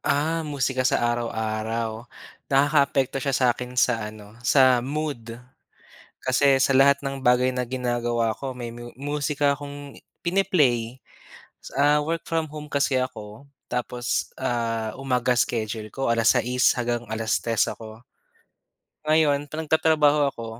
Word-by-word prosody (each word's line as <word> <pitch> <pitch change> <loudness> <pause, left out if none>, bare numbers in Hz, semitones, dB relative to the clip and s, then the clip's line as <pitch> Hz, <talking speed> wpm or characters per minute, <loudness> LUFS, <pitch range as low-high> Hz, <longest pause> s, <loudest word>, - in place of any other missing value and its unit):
Ah, 160 +3 0
musika 130 -1 0
sa - - +3 0.2
araw-araw? 110 -1 -2 0.6
Nakakaapekto 140 -1 +2
siya 135 -2 0
sa 130 - +3
akin 125 0 -7
sa 125 - 0 0.2
ano, 105 -1 -13 0.3
sa 135 -2 +6 0.3
mood. 150 -6 -2 1.1
Kasi 130 +2 +3 0.2
sa 135 - +1
lahat 140 +1 +6
ng 135 0 -3
bagay 125 +1 +4
na 125 0 -1
ginagawa 120 -2 -1
ko 140 - -6
may 120 -1 -5
mu 120 - -9 0.3
musika 145 0 -1
akong 145 0 -8 0.5
pini-play, 170 -9 +2 1.1
ah, 150 +1 +4
work 165 0 -2
from 165 -1 0
home 150 -1 -7
kasi 140 0 +2
ako. 110 -4 -9 0.5
Tapos, 125 0 -3 0.4
ah, 115 -2 -1
umaga 125 -1 +1
schedule 110 -1 -4
ko, 135 - -5
6:00 125 +2 +2
hanggang 120 -1 -1
3:00 115 0 0
ako. 110 - -9 1.2
Ngayon, 155 -2 +4
'pag 155 - -5
nagtatrabaho 155 -1 +3
ako, 115 -3 -8
130 Hz, 130 wpm, -24 LUFS, 120-145 Hz, 1.2 s, sa